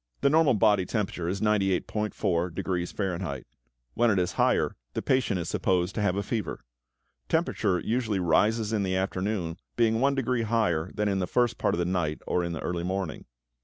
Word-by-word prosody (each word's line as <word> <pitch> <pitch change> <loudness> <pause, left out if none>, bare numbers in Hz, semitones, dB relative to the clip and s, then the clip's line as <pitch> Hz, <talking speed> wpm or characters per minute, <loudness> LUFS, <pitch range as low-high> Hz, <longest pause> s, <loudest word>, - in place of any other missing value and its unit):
= - - -44
The 140 - +4
normal 155 -5 +4
body 105 -3 +4
temperature 95 -6 -2
is 95 +1 -3
98.4 95 -4 0
degrees 90 -1 -2
Fahrenheit. 90 -8 -3 0.5
When 120 0 +3
it 100 - +2
is 90 -1 +1
higher, - - +1 0.2
the - - -2
patient 125 -7 +1
is 85 - -4
supposed 90 +2 0
to 110 - -2
have 95 -3 +1
a 100 - -1
fever. 105 - -3 0.7
Temperature 90 -3 +1
usually 110 -3 -1
rises 105 +6 +2
in 105 - +1
the 95 -1 0
afternoon, 95 -2 -2 0.2
being 115 -1 +2
one 140 +2 +2
degree 125 -2 0
higher 105 -7 +1
than 105 0 0
in 100 -1 +1
the 90 - -1
first 120 -1 +1
part - - +1
of - - -5
the 85 - 0
night 85 -4 -1
or 90 - 0
in 85 - -2
the 80 - -5
early 85 -1 -2
morning. 95 -2 -3
95 Hz, 195 wpm, -27 LUFS, 90-110 Hz, 0.7 s, The